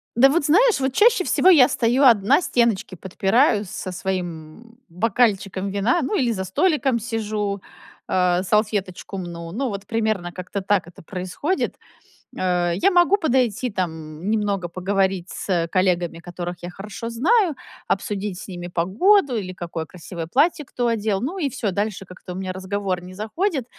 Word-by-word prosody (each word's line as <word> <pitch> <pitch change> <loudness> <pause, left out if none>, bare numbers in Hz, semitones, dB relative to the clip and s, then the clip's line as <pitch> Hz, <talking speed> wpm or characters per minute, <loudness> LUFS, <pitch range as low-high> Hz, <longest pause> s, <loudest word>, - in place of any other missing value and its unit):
Да, 265 +3 +6
вот 295 +1 +1
знаешь, 430 - +4
вот 265 -1 -1
чаще 425 - +4
всего 370 - +3
я 285 -7 +7
стою 250 +2 +2
одна, 240 - +5
стеночки 235 - 0
подпираю 200 - +2
со 185 +1 -6
своим 180 +4 -5
бокальчиком 195 0 0
вина, 205 - +1
ну 315 +9 -1
или 245 -7 +1
за 190 -3 -2
столиком 275 - +1
сижу, 210 -3 -3 0.5
а, 180 -1 +2
салфеточку 200 -2 -1
мну. 170 -2 -6
Ну, 260 +8 -2
вот 200 -1 -6
примерно 215 -5 -1
как-то 185 +3 -5
так 190 -2 +1
это 175 - -14
происходит. 185 - -3 0.6
Э, 175 -2 +1
я 205 - +3
могу 355 +2 +4
подойти, 255 - +1
там, 160 -1 -4
немного 205 -4 0
поговорить 190 0 -1
с, - - -7
э, 170 -2 +1
коллегами, 175 -2 0
которых 175 0 -6
я 175 - -6
хорошо 205 +5 -7
знаю, 335 - +2 0.3
обсудить 200 -1 -2
с - - -9
ними 175 -2 -6
погоду 245 - +3
или 190 -4 -3
какое 170 -2 -5
красивое 170 -1 -7
платье 300 - +2
кто 245 - -3
одел, 215 -3 0
ну 340 +10 -3
и 290 -5 0
всё, 225 -6 -2
дальше 200 0 -2
как-то 180 0 -10
у - - -8
меня 185 -1 -4
разговор 190 -1 -3
не 185 +1 -11
заходит. 265 - -2
200 Hz, 160 wpm, -22 LUFS, 180-245 Hz, 0.6 s, я